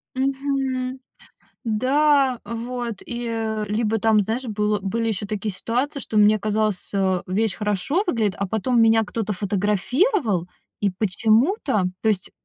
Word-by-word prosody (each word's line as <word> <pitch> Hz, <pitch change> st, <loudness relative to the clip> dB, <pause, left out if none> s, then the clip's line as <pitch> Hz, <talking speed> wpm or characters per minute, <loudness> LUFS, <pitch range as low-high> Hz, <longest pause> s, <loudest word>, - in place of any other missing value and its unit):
Мгм. 265 Hz, -1 st, -1 dB, 0.7 s
Да, 265 Hz, +3 st, +2 dB
вот. 235 Hz, 0 st, -5 dB
И, 240 Hz, 0 st, -5 dB
э, 220 Hz, -2 st, -2 dB
либо 220 Hz, +1 st, 0 dB
там, 215 Hz, 0 st, +4 dB
знаешь, 225 Hz, +6 st, -2 dB
был 210 Hz, -2 st, 0 dB
были 225 Hz, +4 st, -1 dB
ещё 205 Hz, -2 st, -2 dB
такие 210 Hz, 0 st, -3 dB
ситуации, 250 Hz, +9 st, -2 dB
что 220 Hz, -, -4 dB
мне 210 Hz, +1 st, +5 dB
казалось, 215 Hz, -2 st, -1 dB
а, 190 Hz, -2 st, +1 dB
вещь 210 Hz, +3 st, 0 dB
хорошо 210 Hz, -, 0 dB
выглядит, 220 Hz, -, 0 dB
а 200 Hz, -, -1 dB
потом 230 Hz, +4 st, +1 dB
меня 225 Hz, 0 st, +5 dB
кто-то 215 Hz, 0 st, -3 dB
фотографировал, 205 Hz, -, +1 dB, 0.3 s
и 200 Hz, -2 st, +2 dB
почему-то 220 Hz, -, +1 dB, 0.2 s
То 220 Hz, -, +2 dB
есть 195 Hz, -4 st, 0 dB
220 Hz, 140 wpm, -23 LUFS, 205-255 Hz, 0.7 s, мне